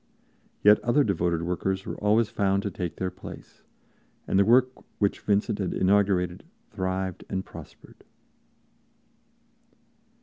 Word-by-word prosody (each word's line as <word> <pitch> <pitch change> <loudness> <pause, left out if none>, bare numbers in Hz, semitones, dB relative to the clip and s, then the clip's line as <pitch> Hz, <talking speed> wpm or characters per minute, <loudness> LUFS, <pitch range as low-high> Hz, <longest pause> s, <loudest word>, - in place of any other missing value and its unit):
Yet 105 +1 +7
other 140 +5 +2
devoted 85 -6 0
workers 95 +2 -2
were - - -4
always 105 +2 +2
found 100 -1 0
to 100 - -3
take 90 -1 -4
their 95 -1 -3
place, - - -12 0.6
and 95 - +1
the - - +6
work 125 +3 +5 0.3
which 100 -1 0
Vincent 105 0 0
had 95 -3 -2
inaugurated 95 -2 +2 0.3
thrived 95 -2 -3
and 95 0 -3
prospered. - - -13
95 Hz, 125 wpm, -26 LUFS, 95-105 Hz, 0.6 s, Yet